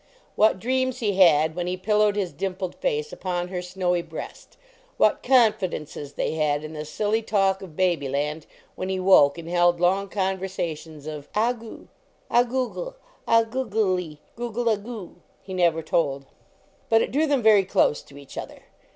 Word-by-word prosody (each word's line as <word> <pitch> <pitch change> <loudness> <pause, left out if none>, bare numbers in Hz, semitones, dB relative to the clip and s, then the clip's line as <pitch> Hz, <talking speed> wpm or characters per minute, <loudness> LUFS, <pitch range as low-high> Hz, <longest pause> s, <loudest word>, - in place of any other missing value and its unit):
"What 215 -2 +4
dreams 260 +4 0
he 210 -6 -1
had 160 -4 +5
when 175 0 -3
he 180 +1 -2
pillowed 210 +1 +2
his 190 -6 -2
dimpled 185 +2 -4
face 455 -2 -2
upon 180 -1 -3
her 180 -1 -3
snowy 180 -1 -1
breast; - - -9 0.4
what - - +3
confidences 185 - +1
they - - -2
had 150 -2 0
in 155 +1 -7
the 150 0 -5
silly 210 +8 -1
talk 195 -3 +1
of 180 -5 -10
baby 175 -7 +1
land 150 +3 -2 0.3
when 185 - -5
he 190 0 -1
woke 185 -7 +5
and 165 -1 -8
held 175 0 +3
long 190 +3 +2
conversa 190 -4 -2
tions 155 -1 -13
of 150 -2 -7
"ah 230 +4 +2
goo, 230 -2 -12 0.4
ah 240 - +6
google, 260 - -3 0.3
ah 230 0 +5
googelie, 210 - -1 0.2
google 240 0 -2
ah 220 - +3
goo," 210 -2 -9 0.3
he 190 - -8
never 170 -3 +2
told. 140 -4 0 0.6
But 225 0 +5
it - - -4
drew 305 +4 +2
them 280 -5 +1
very 215 -3 +6
close 165 -5 +2
to 140 - -16
each 140 -1 -9
other. - - -9
185 Hz, 175 wpm, -24 LUFS, 160-220 Hz, 0.6 s, ah